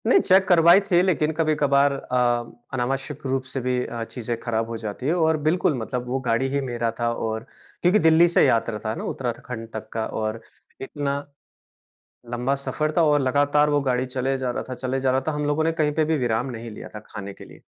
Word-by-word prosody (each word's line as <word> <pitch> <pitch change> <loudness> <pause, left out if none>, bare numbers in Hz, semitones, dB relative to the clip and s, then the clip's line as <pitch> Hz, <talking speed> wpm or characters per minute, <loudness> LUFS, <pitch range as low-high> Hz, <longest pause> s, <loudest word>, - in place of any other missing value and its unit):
नहीं - - +6
चेक 190 - +4
करवाई 170 +1 +7
थी, 185 -3 +3
लेकिन 165 -4 +1
कभी-कभार 145 -3 +3
अ, 120 -3 0 0.2
अनावश्यक 135 +3 -3
रूप 130 0 0
से 135 - -2
भी 125 +1 0
अ, 115 -1 -5
चीज़ें 120 0 -5
खराब 115 -1 -2
हो 115 - -4
जाती 110 +3 -6
है 160 - +3
और 160 -2 +2
बिल्कुल, 160 -2 +2
मतलब 125 +2 -4
वो 130 +2 -1
गाड़ी 115 +4 +2
ही 140 - +1
मेरा 120 -3 -2
था, 120 0 +1
और 110 -1 -3 0.4
क्योंकि 180 +4 +4
दिल्ली 160 0 +6
से 170 - +4
यात्रा 115 -4 +1
था 110 +1 -1
ना - - -6
उत्तराखंड 120 -2 -5
तक 110 0 -6
का। 110 -1 -1 0.2
और 110 +1 -3 0.4
इतना 140 +1 -3 1.2
लंबा 125 +3 0
सफर 155 0 -1
था 170 - +5
और 150 -1 +3
लगातार 145 +3 +3
वो 145 -1 +2
गाड़ी 130 -1 0
चले 130 +1 -1
जा 130 -2 -2
रहा - - -4
था 130 - -4
चले 130 +1 -2
जा 130 0 +1
रहा 130 +1 +1
था। - - +2
हम 150 0 -2
लोगों 145 +2 +1
ने 165 - +2
कहीं 150 -1 +2
पे 155 - +2
भी 160 0 +1
विराम 120 -2 0
नहीं 115 0 -7
लिया 105 - -9
था, - - -5
खाने 100 -2 -8
के - - -13
लिए। - - -16
130 Hz, 220 wpm, -24 LUFS, 120-150 Hz, 1.2 s, करवाई